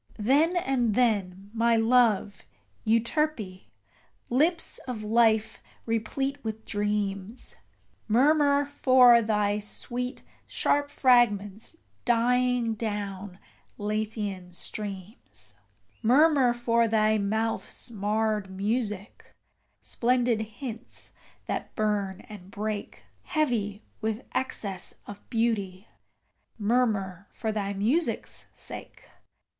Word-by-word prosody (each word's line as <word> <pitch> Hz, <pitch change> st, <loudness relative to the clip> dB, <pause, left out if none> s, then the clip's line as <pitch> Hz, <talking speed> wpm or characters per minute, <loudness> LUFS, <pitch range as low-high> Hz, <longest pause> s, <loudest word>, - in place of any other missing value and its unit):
Then 290 Hz, -, +3 dB
and 250 Hz, -9 st, +1 dB
then, 200 Hz, -5 st, 0 dB
my 230 Hz, 0 st, +3 dB
love, 225 Hz, -3 st, +3 dB, 0.5 s
Euterpe, 230 Hz, -4 st, 0 dB, 0.7 s
lips 320 Hz, +7 st, +2 dB
of 235 Hz, -4 st, -4 dB
life 220 Hz, 0 st, +2 dB, 0.2 s
replete 270 Hz, +5 st, -2 dB
with 220 Hz, 0 st, -5 dB
dreams 205 Hz, +1 st, -2 dB, 0.5 s
Murmur 285 Hz, +4 st, +4 dB
for 255 Hz, -4 st, +6 dB
thy 210 Hz, -2 st, +1 dB
sweet, 245 Hz, +4 st, -4 dB, 0.2 s
sharp 285 Hz, 0 st, +1 dB
fragments 230 Hz, -, +2 dB, 0.3 s
dying 245 Hz, 0 st, +2 dB
down 205 Hz, -3 st, -4 dB, 0.4 s
Lethean 210 Hz, -3 st, -3 dB
streams: 185 Hz, -, -6 dB, 0.5 s
Murmur 270 Hz, +1 st, +5 dB
for 235 Hz, -1 st, +2 dB
thy 215 Hz, -1 st, +2 dB
mouth's 220 Hz, +4 st, -1 dB
marred 210 Hz, -1 st, -1 dB
music, 210 Hz, +1 st, -3 dB, 0.5 s
splendid 245 Hz, -2 st, +1 dB
hints 225 Hz, +2 st, -8 dB, 0.3 s
that -, -, -4 dB
burn 205 Hz, -3 st, -1 dB
and 200 Hz, -4 st, -12 dB
break, 210 Hz, 0 st, -5 dB, 0.2 s
Heavy 225 Hz, -, -1 dB, 0.2 s
with 220 Hz, +1 st, -2 dB
excess 200 Hz, -7 st, -2 dB
of 205 Hz, 0 st, -9 dB
beauty: 215 Hz, -5 st, -1 dB, 0.7 s
murmur 205 Hz, -5 st, 0 dB
for 220 Hz, -, -3 dB
thy 200 Hz, -2 st, -2 dB
music's 240 Hz, -, -1 dB
sake. -, -, -6 dB
220 Hz, 90 wpm, -27 LUFS, 205-245 Hz, 0.7 s, for